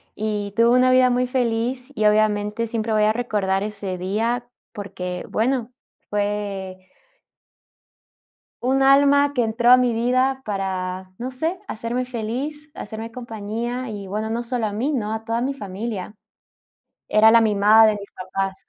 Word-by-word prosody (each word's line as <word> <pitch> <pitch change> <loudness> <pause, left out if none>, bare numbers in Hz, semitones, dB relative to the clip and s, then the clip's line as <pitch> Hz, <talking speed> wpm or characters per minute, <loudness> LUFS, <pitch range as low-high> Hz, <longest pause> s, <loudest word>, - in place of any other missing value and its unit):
y 210 -1 -3
tuvo 235 +1 +5
una 255 0 +4
vida 255 0 +5
muy 250 0 +1
feliz, 250 +1 -1
y, 215 - 0
obviamente, 210 +1 +2
siempre 225 -1 -2
voy 215 0 +3
a 215 +1 +3
recordar 205 -5 -1
ese 200 -3 -5
día, 230 +7 -2 0.2
porque, 180 -3 -5
bueno, 245 +1 0 0.4
fue 200 -3 -3 1.7
un 270 +2 +2
alma 280 +1 +5
que 250 -4 +1
entró 235 +2 +2
a 255 - +9
mi 250 -1 +2
vida 255 +3 +1
para, 185 -2 -3
no 255 +2 -5
sé, 325 +8 -2
hacerme 235 +3 -3
feliz, 260 +6 -5
hacerme 220 +2 -7
compañía 235 +1 -5
y, 205 -2 -6
bueno, 215 +3 -3
no 230 +2 -2
solo 235 -2 -2
a - - -4
mí, 240 +9 -1
¿no? 220 -5 -2
A 220 0 -5
toda 230 +1 -1
mi 270 +2 -1
familia. 205 -2 -5 1.0
Era 220 +1 +6
la 230 0 +6
mimada 215 +1 +5
de 215 - +1
mis 200 - -11
papás. 190 +1 -3
225 Hz, 155 wpm, -22 LUFS, 205-250 Hz, 1.7 s, a